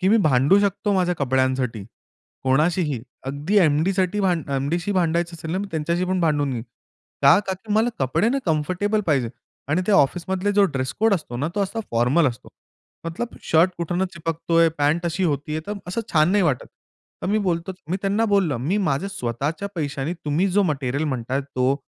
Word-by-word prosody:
की 190 Hz, -, +2 dB
मी 220 Hz, -, +5 dB
भांडू 140 Hz, +7 st, +4 dB
शकतो 205 Hz, +1 st, 0 dB
माझ्या 180 Hz, -2 st, +1 dB
कपड्यांसाठी, 130 Hz, -5 st, 0 dB, 0.6 s
कोणाशीही. 150 Hz, +1 st, +1 dB, 0.3 s
अगदी 145 Hz, +9 st, -1 dB
एम-डीसाठी 185 Hz, +5 st, +2 dB
भांड 175 Hz, -7 st, 0 dB
एम-डीशी 160 Hz, +8 st, -1 dB
भांडायचं 170 Hz, -1 st, 0 dB
असेल 160 Hz, 0 st, -7 dB
ना, 185 Hz, -, 0 dB
मी 205 Hz, -, -3 dB
त्यांच्याशी 170 Hz, +3 st, -1 dB
पण 185 Hz, 0 st, 0 dB
भांडून 145 Hz, -4 st, +1 dB
घेईन. 115 Hz, -2 st, -3 dB, 0.6 s
का? 140 Hz, +5 st, +7 dB
का 190 Hz, -, -1 dB
की 205 Hz, +3 st, -6 dB
मला 220 Hz, +3 st, +3 dB
कपडे 135 Hz, -, +1 dB
ना, 275 Hz, -, +1 dB
कम्फर्टेबल 185 Hz, +7 st, 0 dB
पाहिजे. 130 Hz, -7 st, +1 dB, 0.4 s
आणि 160 Hz, +6 st, +1 dB
त्या 210 Hz, -, +3 dB
ऑफिसमधले 185 Hz, +5 st, +1 dB
जो 200 Hz, 0 st, +5 dB
ड्रेस 130 Hz, -6 st, -2 dB
कोड 220 Hz, -2 st, +4 dB
असतो 125 Hz, -9 st, -5 dB
ना, 145 Hz, +5 st, -1 dB
तो 205 Hz, -, 0 dB
असा 210 Hz, +4 st, -3 dB
फॉर्मल 125 Hz, +8 st, +3 dB
असतो. 120 Hz, -, -9 dB, 0.6 s
मतलब 230 Hz, +9 st, -5 dB
शर्ट 165 Hz, +3 st, +3 dB
कुठून 175 Hz, +2 st, -1 dB
चिपकतोय, 165 Hz, 0 st, +1 dB
पँट 150 Hz, +4 st, +1 dB
अशी 180 Hz, +3 st, -1 dB
होतीय, 150 Hz, 0 st, -1 dB
तर 205 Hz, -, -3 dB, 0.2 s
असं 185 Hz, +6 st, -2 dB
छान 155 Hz, +2 st, +4 dB
नाही 205 Hz, -1 st, +3 dB
वाटत. 145 Hz, -7 st, 0 dB, 0.6 s
तर -, -, -2 dB
मी 210 Hz, +3 st, +2 dB
बोलतो 180 Hz, -2 st, -1 dB, 0.2 s
मी 185 Hz, -, +1 dB
त्यांना 200 Hz, +3 st, +1 dB
बोललो 195 Hz, -, +2 dB
मी 155 Hz, -, -1 dB
माझ्या 185 Hz, -1 st, 0 dB
स्वतःच्या 155 Hz, -, -3 dB
पैशाने 145 Hz, 0 st, -2 dB
तुम्ही 155 Hz, +6 st, +1 dB
जो 200 Hz, +2 st, +3 dB
मटेरिअल 140 Hz, -3 st, -1 dB
म्हणताय 130 Hz, -1 st, -2 dB
तो, 135 Hz, -1 st, 0 dB
165 Hz, 180 wpm, -23 LUFS, 140-190 Hz, 0.6 s, का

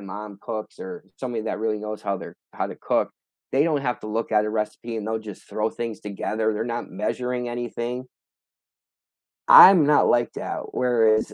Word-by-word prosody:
mom 100 Hz, +1 st, -8 dB
cooks 110 Hz, -2 st, -6 dB
or 230 Hz, -1 st, -8 dB
somebody 120 Hz, -4 st, -3 dB
that -, -, -2 dB
really 110 Hz, -1 st, -1 dB
knows 105 Hz, 0 st, -6 dB
how 100 Hz, -1 st, -1 dB
they're -, -, -10 dB, 0.2 s
how -, -, -2 dB
to -, -, -8 dB
cook, -, -, 0 dB, 0.4 s
they 140 Hz, +2 st, +3 dB
don't 155 Hz, -3 st, +1 dB
have 125 Hz, -3 st, -2 dB
to -, -, -8 dB
look 115 Hz, +2 st, -2 dB
at 105 Hz, 0 st, +4 dB
a 105 Hz, -, -2 dB
recipe 110 Hz, +2 st, -3 dB
and 110 Hz, -1 st, -4 dB
they'll 110 Hz, 0 st, -1 dB
just 105 Hz, -3 st, -11 dB
throw 110 Hz, +1 st, -1 dB
things 115 Hz, -2 st, -5 dB
together. 110 Hz, +2 st, -2 dB
They're 105 Hz, +1 st, -2 dB
not 120 Hz, 0 st, -4 dB
measuring 125 Hz, -1 st, -2 dB
anything. 120 Hz, +1 st, -4 dB, 1.4 s
I'm 180 Hz, -5 st, +10 dB
not 150 Hz, 0 st, +4 dB
like 120 Hz, -2 st, +2 dB
that. -, -, -5 dB
Whereas, 110 Hz, -4 st, +2 dB
115 Hz, 185 wpm, -24 LUFS, 105-125 Hz, 1.4 s, I'm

